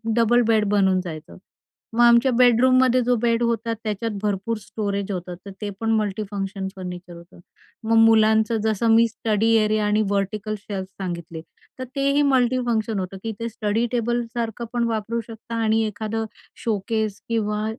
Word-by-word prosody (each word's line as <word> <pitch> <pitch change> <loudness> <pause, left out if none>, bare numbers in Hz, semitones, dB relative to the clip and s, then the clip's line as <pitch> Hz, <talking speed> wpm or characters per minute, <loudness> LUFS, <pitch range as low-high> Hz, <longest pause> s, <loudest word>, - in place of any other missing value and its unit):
Double 235 +1 +4
bed 220 -2 +3
बनून 190 -2 +3
जायचं. 160 -3 -9 0.6
मग 235 - +2
आमच्या 235 +2 +5
बेडरूममध्ये 255 +1 +4
जो 245 0 +2
बेड 235 0 +1
होता 230 0 0
त्याच्यात 220 +1 -2
भरपूर 210 +2 -1
स्टोरेज 200 -1 -3
होतं, 180 -1 -5
तर 200 - -8
ते 210 - -3
पण 225 0 0
मल्टीफंक्शन 200 -2 -3
फर्निचर 180 -1 -8
होतं. 170 +1 -15 0.4
मग 225 +1 +1
मुलांचं 220 0 +4
जसं 220 +1 0
मी 230 +1 +5
स्टडी 220 0 0
एरिया 215 0 +1
आणि 210 +1 +2
व्हर्टिकल 205 +2 -2
शेल्फ 195 -2 -6
सांगितले, 170 -3 -5 0.4
तर - - -3
तेही 280 +1 +2
मल्टीफंक्शन 240 -4 +1
होतं, 185 +1 -5
की 225 - -3
ते 230 0 -3
स्टडी 220 +1 -1
टेबलसारखं 235 -1 -2
पण 240 -1 0
वापरू 225 +1 -2
शकता 230 0 -8
आणि 220 0 +2
एखादं 220 +1 -3 0.4
शोकेस 215 -1 -2
किंवा 210 -2 -1
220 Hz, 150 wpm, -23 LUFS, 200-230 Hz, 0.6 s, आमच्या